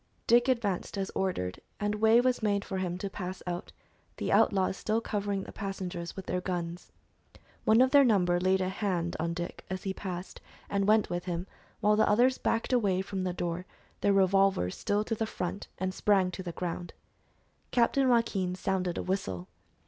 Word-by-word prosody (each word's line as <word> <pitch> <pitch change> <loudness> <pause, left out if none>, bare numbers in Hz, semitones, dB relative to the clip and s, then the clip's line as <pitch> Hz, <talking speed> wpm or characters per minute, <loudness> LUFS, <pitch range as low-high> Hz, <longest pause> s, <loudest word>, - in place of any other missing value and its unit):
Dick 240 +1 +5
advanced, 215 -7 0
as 195 -1 -2
ordered, 90 - -2 0.2
and 210 0 0
way 220 +1 +6
was 250 0 +2
made 200 -2 +1
for 190 - -3
him 180 -1 -2
to 200 - -4
pass 185 -1 -6
out, 175 -1 -4 0.5
the - - -2
outlaws 190 -1 +3
still 220 +3 0
covering 205 -3 -2
the - - -9
passengers 185 -4 -5
with 190 - -7
their 180 0 -1
guns. 175 -1 -4 0.7
One 220 +3 +6
of 260 0 +4
their 285 -1 +7
number 180 -7 +3
laid 190 +1 +2
a 185 - 0
hand 185 -3 -1
on 170 +1 -1
Dick 175 0 -5
as 185 0 -4
he 195 - -2
passed, 185 -2 -6 0.3
and 200 0 +1
went 215 0 +4
with 175 0 -2
him, 175 -1 -3 0.4
while 210 +1 +4
the 215 - +3
others 245 +5 +4
backed 230 +3 0
away 195 -6 +2
from 190 -1 -3
the 180 - 0
door, 175 +1 -3 0.3
their 200 - +3
revolvers 195 - +3
still 205 +1 0
to 225 - -3
the 220 0 -1
front, 190 -1 -4
and 185 0 -2
sprang 190 -2 +2
to 180 - -6
the 180 -2 -5
ground. 175 0 -4 0.8
Captain 255 +2 +3
Joaquin 200 -7 +1
sounded 185 -2 -1
a - - -2
whistle. 95 - -3
190 Hz, 185 wpm, -30 LUFS, 180-210 Hz, 0.8 s, their